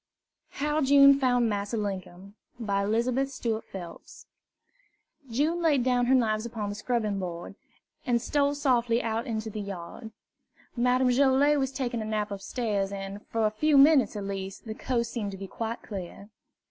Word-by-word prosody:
HOW 300 +2 0
JUNE 275 0 +7
FOUND 245 -3 +2
MASSA 205 +1 -2
LINKUM 195 -2 -5 0.3
By 200 -3 0
Elizabeth 240 +6 0
Stuart 230 -4 -3
Phelps 175 -3 -10 1.0
June 305 +9 0
laid 295 -6 +3
down 245 -1 +2
her 265 - +5
knives 215 -3 +1
upon 225 -3 -4
the - - -3
scrubbing 215 -2 -1
board, 175 0 -6 0.5
and 240 -2 +1
stole 285 +3 +1
softly 245 -4 +1
out 225 0 -2
into 220 -1 -3
the 210 - -5
yard. 200 +3 -7 0.7
Madame 250 +1 +2
Joilet 280 +3 +4
was 265 -1 -1
taking 245 -4 -3
a - - -4
nap 215 -1 -2
upstairs, 200 -1 -2
and, 195 +1 -6
for 225 -1 0
a 215 - +2
few 295 +7 +2
minutes 275 -4 +6
at 205 - -4
least, 195 +1 -6
the 220 - -5
coast 235 0 -2
seemed 215 -5 -3
to - - -7
be 195 - -7
quite 225 +4 -5
clear. 200 0 -8
230 Hz, 165 wpm, -27 LUFS, 205-260 Hz, 1.0 s, JUNE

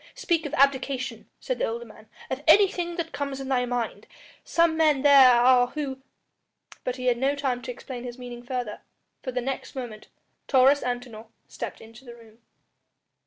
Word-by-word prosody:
"Speak 330 -3 0
of 295 - -10
abdication," 265 -4 0
said - - -3
the - - +1
older 235 +1 -5
man, 215 -1 -16 0.2
"of 260 +1 -3
anything 350 -1 +4
that 335 -2 -4
comes 280 -1 -4
in 270 0 -6
thy 250 -2 +1
mind. 245 -1 -3 0.4
Some 335 -1 +2
men 305 -4 +3
there 275 -3 +8
are 245 +1 +5
who 270 -1 -5 0.4
" - - -24
But 250 - -2
he 255 -1 -6
had 245 -1 +2
no 275 +2 +1
time 265 -3 -2
to 250 - -5
explain 245 0 -8
his 245 0 -7
meaning 245 -1 -8
further, 245 -3 -5 0.4
for 255 - -4
the 250 0 -2
next 270 +2 -5
moment 235 -5 -7 0.4
Taurus 270 +2 +5
Antinor 245 -3 -5 0.2
stepped - - -7
into 225 +3 -14
the 240 -2 -11
room. 225 -1 -18
255 Hz, 180 wpm, -26 LUFS, 240-280 Hz, 0.4 s, there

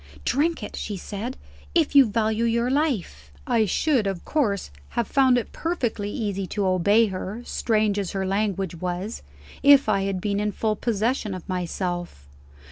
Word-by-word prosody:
"Drink 315 -1 +1
it," - - -6
she 205 -2 -4
said, 210 +7 -5 0.4
"if 325 -4 +3
you 275 -3 +8
value 220 +1 0
your 235 +2 +1
life!" 210 - -1
I 230 -3 +2
should 250 - +1
of 195 -3 -4
course 210 - 0 0.3
have 235 - +2
found 265 -3 +4
it 240 - -3
perfectly 240 -11 -2
easy 200 -3 -3
to 205 +1 -2
obey 200 +5 +4
her, 200 +3 -5
strange 215 -3 +1
as 195 -1 -3
her 195 -1 -1
language 195 -2 -1
was, 180 +4 -4 0.4
if 280 -2 +7
I 195 -2 +2
had 195 -1 -1
been 200 +1 -1
in 210 0 -1
full 215 -1 0
possession 220 -1 -1
of 185 - -9
myself. 175 - -3
210 Hz, 165 wpm, -24 LUFS, 190-240 Hz, 0.4 s, you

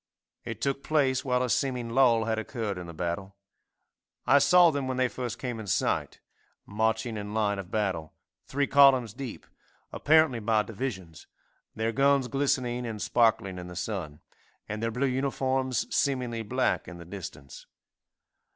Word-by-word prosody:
It - - -6
took 140 0 -1
place 140 -4 +1
while 125 -1 +1
a 125 - -2
seeming 125 0 -1
lull 115 -3 +4
had 110 0 0
occurred 110 -4 -4
in 90 - -8
the - - -7
battle. 90 +4 -4 0.9
I 145 - +6
saw 175 +2 +6
them 140 -3 -2
when 130 -1 -2
they 130 0 +3
first 125 -2 -5
came 125 -3 -4
in 110 - -7
sight, - - 0 0.5
marching 110 +2 -1
in 105 +1 -6
line 100 -2 +1
of 90 -2 -7
battle, 95 -8 -2 0.3
three 140 +1 0
columns 130 -5 +5
deep, 130 -2 -7 0.5
apparently 155 -5 +3
by 110 -1 +2
divisions, 100 -8 -6 0.5
their 110 +1 -1
guns 140 +1 +3
glistening 125 -2 0
and 115 -3 -5
sparkling 105 -5 +1
in 90 - -8
the 90 - -9
sun, 85 -5 -5 0.5
and 110 +1 -5
their 115 - 0
blue 125 +4 -1
uniforms 130 -1 0
seemingly 125 -5 0
black 130 +4 0
in 90 - -9
the 85 - -11
distance. 80 -8 -9
115 Hz, 160 wpm, -28 LUFS, 105-130 Hz, 0.9 s, I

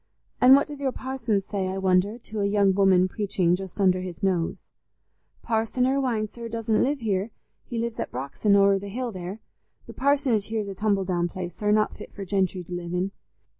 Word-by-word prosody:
And 255 +2 +9
what 280 - +3
does 290 -1 -9
your 270 -2 +1
parson 250 -7 -2
say, 195 -1 -3
I 190 +1 -3
wonder, 190 +3 +2
to 220 -2 -7
a 200 - +2
young 200 -1 +3
woman 190 -2 +4
preaching 185 -3 +1
just 190 +1 -8
under 185 -2 +3
his 180 -1 -7
nose?" 180 -4 0 0.8
"Parson 225 +2 0
Irwine, 255 -5 +1
sir, 235 +2 -8
doesn't 225 -1 0
live 275 0 0
here; 205 -1 0 0.4
he 240 - -5
lives 230 0 -3
at - - -2
Brox'on, 140 - 0
over 200 0 +5
the 200 +1 -7
hill 245 +3 -3
there. 185 +2 -7 0.4
The - - -10
parsonage 270 -7 +1
here's 220 -2 -2
a - - -4
tumble 200 -1 0
down 175 -2 0
place, 175 0 -6
sir, 210 - -1
not 215 0 +2
fit - - -10
for 200 - -6
gentry 190 -1 0
to 180 - -9
live 175 0 -4
in. 185 +2 -1
200 Hz, 205 wpm, -25 LUFS, 185-230 Hz, 0.8 s, And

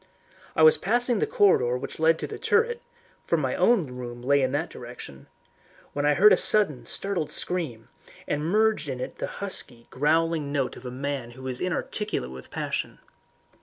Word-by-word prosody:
I 160 - +4
was 155 - +7
passing 240 +4 +1
the 445 - +1
corridor 410 - +3
which 125 - -7
led 160 +1 +4
to - - -4
the - - -7
turret 470 +1 +1 0.5
for - - +2
my - - -1
own 230 -8 +3
room 125 -2 -8
lay 140 +2 +3
in 130 -1 +1
that 155 +4 -1
direction 120 - -10 0.7
when 145 0 0
I 150 - +4
heard 210 +4 +7
a - - +5
sudden, 195 -12 +3
startled 190 -6 -1
scream, 150 -12 -3 0.4
and 150 - -1
merged 210 -2 +2
in 130 -2 -4
it - - -6
the - - -2
husky, 130 -12 -6
growling 155 +1 +1
note 140 -3 -1
of 125 - -9
a - - -4
man 135 -1 -4
who 130 - -10
is 130 -1 -2
inarticulate 185 - -2
with 65 0 -10
passion. - - -3
150 Hz, 180 wpm, -26 LUFS, 125-195 Hz, 0.7 s, was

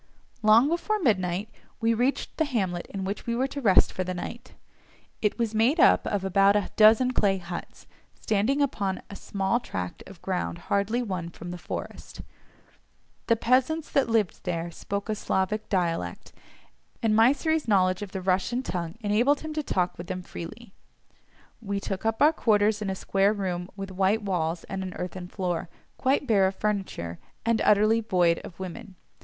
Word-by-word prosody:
Long 220 +4 +6
before 345 +7 0
midnight 195 - +1 0.3
we 230 0 +2
reached 250 +5 -1
the 315 - +2
hamlet 190 -10 -2
in 195 -1 -5
which 200 +4 -4
we 235 - 0
were 255 +2 +1
to 280 +1 -5
rest 195 -6 +5
for 185 - -2
the 185 0 -4
night; 240 +7 -7 0.7
it 210 - +1
was 230 -2 -1
made 235 +9 +3
up - - +5
of 200 -2 -1
about 195 +1 +4
a 205 -2 0
dozen 225 +4 +6
clay 195 -4 +2
huts, 175 -1 -8 0.3
standing 225 +8 +1
upon 200 -8 -2
a - - -7
small 195 +4 -1
tract 90 - -5
of 195 -3 -12
ground 180 -2 -2 0.2
hardly 210 +5 +1
won 185 -6 -4
from 175 +1 -9
the - - -5
forest. - - -7 1.1
The 230 - +4
peasants 255 +7 +1
that 275 -4 +2
lived 220 -5 0
there 170 -1 -3
spoke 200 +3 -4
a 215 - 0
Slavonic 210 +1 -1
dialect, 165 - -2 0.7
and 220 -1 +3
Mysseri's 285 +6 +3
knowledge 185 -3 +3
of 205 -3 -6
the 190 - -4
Russian 190 +7 0
tongue 170 -6 -4
enabled 230 +7 +2
him 315 -1 -5
to 305 - -1
talk 180 - -1
with 175 - -7
them 185 -1 -4
freely. 190 +6 -9 0.9
We 200 -2 -2
took 195 +2 -3
up 225 +4 +1
our 305 +2 +6
quarters 215 -5 +2
in 205 - -2
a 190 - -2
square 195 +2 +2
room 180 -3 -3
with 195 -1 -6
white 195 +4 +1
walls 170 -4 -1
and 195 0 -5
an 185 -1 -5
earthen 180 0 -5
floor, 180 -2 -3 0.3
quite 270 +2 +2
bare 200 -6 +4
of 190 - -3
furniture, 190 - -3 0.3
and 230 -1 +2
utterly 215 +2 +4
void 175 -6 +2
of 170 - -11
women. 190 +2 -7
200 Hz, 175 wpm, -27 LUFS, 185-230 Hz, 1.1 s, Long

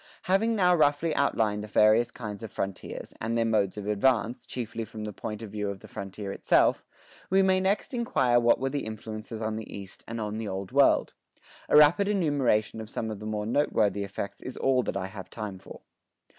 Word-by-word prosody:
Having 215 +5 +2
now 180 -3 +4
roughly 155 +1 +2
outlined 105 -7 +1
the - - -7
various 110 +3 +4
kinds 105 -3 -7
of 115 - -7
frontiers, 95 -1 -5
and 115 +1 -1
their 115 - +2
modes 105 -3 +1
of 105 - -5
advance, 115 +3 +1
chiefly 115 -2 -4
from 110 0 -8
the 105 -1 -5
point 105 +3 -6
of 105 - -8
view 105 -1 -2
of 100 -1 -6
the - - -12
frontier 100 +1 -6
itself, - - +3 0.5
we 190 +1 +4
may 190 0 +3
next 195 +8 0
inquire 130 - +2
what 120 0 +4
were 135 0 -1
the 145 0 -2
influences 110 0 -6
on 110 0 -2
the 110 - -7
East 100 -1 -9
and 115 0 -5
on 105 0 -3
the 110 - -4
Old 95 -1 -5
World. 140 0 +4 0.6
A - - +6
rapid 150 +7 +6
enumeration 140 - +1
of 110 - -9
some 110 0 -3
of 105 - -6
the 105 - -6
more 105 -1 -2
noteworthy 105 -5 +1
effects 100 0 -6
is 130 - -7
all 130 -1 +2
that 110 - -3
I 95 - -2
have 95 -1 -9
time 105 -4 -6
for. - - -12
110 Hz, 210 wpm, -28 LUFS, 105-135 Hz, 0.6 s, A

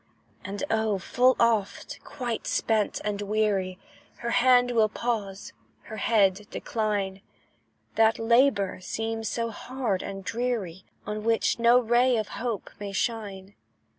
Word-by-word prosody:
And 195 +5 -5
oh! 220 -2 +1
full 250 +7 +3
oft, 225 -4 0
quite 250 -5 -4
spent 215 -2 0
and 205 -1 -2
weary, 200 -3 0 0.4
Her 235 0 -3
hand 245 0 +4
will 220 -3 +3
pause, 210 -4 -3 0.3
her 220 - -8
head 205 -2 +2
decline; 205 -5 -2 0.8
That 225 0 +4
labour 225 -4 +2
seems 225 +3 -3
so 230 -1 -2
hard 240 -4 -3
and 195 0 -6
dreary, 220 -6 -3 0.2
On 210 0 -4
which 230 +1 +1
no 235 +1 +6
ray 245 +1 +3
of 215 -1 -2
hope 230 -4 -4
may 205 -1 -5
shine. 200 -3 -3
220 Hz, 130 wpm, -27 LUFS, 200-235 Hz, 0.8 s, no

